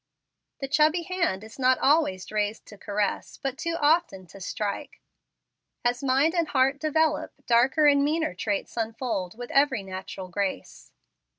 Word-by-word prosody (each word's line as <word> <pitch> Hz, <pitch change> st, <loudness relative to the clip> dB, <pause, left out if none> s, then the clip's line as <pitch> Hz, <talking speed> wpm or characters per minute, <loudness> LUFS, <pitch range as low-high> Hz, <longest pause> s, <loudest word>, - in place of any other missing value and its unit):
The 270 Hz, -, -2 dB
chubby 310 Hz, +4 st, +3 dB
hand 335 Hz, -, -1 dB
is 220 Hz, +4 st, -13 dB
not 255 Hz, 0 st, +4 dB
always 270 Hz, -, +2 dB
raised 210 Hz, 0 st, -2 dB
to 210 Hz, -, -12 dB
caress, 205 Hz, 0 st, -2 dB
but 270 Hz, -3 st, -3 dB
too 335 Hz, +3 st, -3 dB
often 295 Hz, -, +2 dB
to 195 Hz, -, -12 dB
strike. 200 Hz, +2 st, -4 dB, 0.9 s
As 245 Hz, 0 st, +1 dB
mind 275 Hz, +5 st, +3 dB
and 340 Hz, -3 st, +1 dB
heart 270 Hz, 0 st, +2 dB
develop, 315 Hz, +1 st, 0 dB
darker 255 Hz, +6 st, +4 dB
and 280 Hz, -1 st, +5 dB
meaner 310 Hz, -, 0 dB
traits 200 Hz, +2 st, -3 dB
unfold 225 Hz, -4 st, -3 dB
with 245 Hz, 0 st, -7 dB
every 275 Hz, -7 st, +3 dB
natural 190 Hz, 0 st, -7 dB
grace. 185 Hz, -, -4 dB
255 Hz, 150 wpm, -26 LUFS, 205-300 Hz, 0.9 s, and